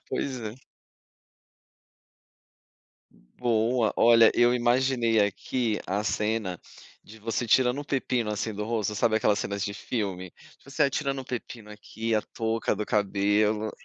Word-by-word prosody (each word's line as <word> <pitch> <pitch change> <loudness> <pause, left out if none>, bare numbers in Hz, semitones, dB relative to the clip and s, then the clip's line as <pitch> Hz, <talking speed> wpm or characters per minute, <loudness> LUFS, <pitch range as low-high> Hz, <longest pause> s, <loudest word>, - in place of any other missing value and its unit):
Pois 130 -3 -3
é. 110 0 -6 2.8
Boa, 115 -1 +1
olha, 115 -1 +6
eu 120 0 +4
imaginei 120 -2 +2
aqui 110 +2 -1
a 100 +3 -1
cena, 105 -4 -1 0.5
de 110 +1 -14
você 115 +2 -2
tirando 125 +3 +3
o - - -7
pepino, 125 -5 -1
assim, 105 +1 -3
do 105 +1 -4
rosto, 110 -2 -2
sabe 110 +1 +2
aquelas 105 -1 +2
cenas 100 -2 -3
de 100 +1 -3
filme? 95 -6 -4 0.3
Você 140 +2 -1
a 140 - +2
tirando 140 0 -2
o 130 - -8
pepino 120 -3 -7
aqui, 110 +2 -4
a 110 - +1
touca 115 -1 -2
do 105 +1 -4
cabelo. 105 +1 +1
110 Hz, 140 wpm, -27 LUFS, 105-120 Hz, 2.8 s, olha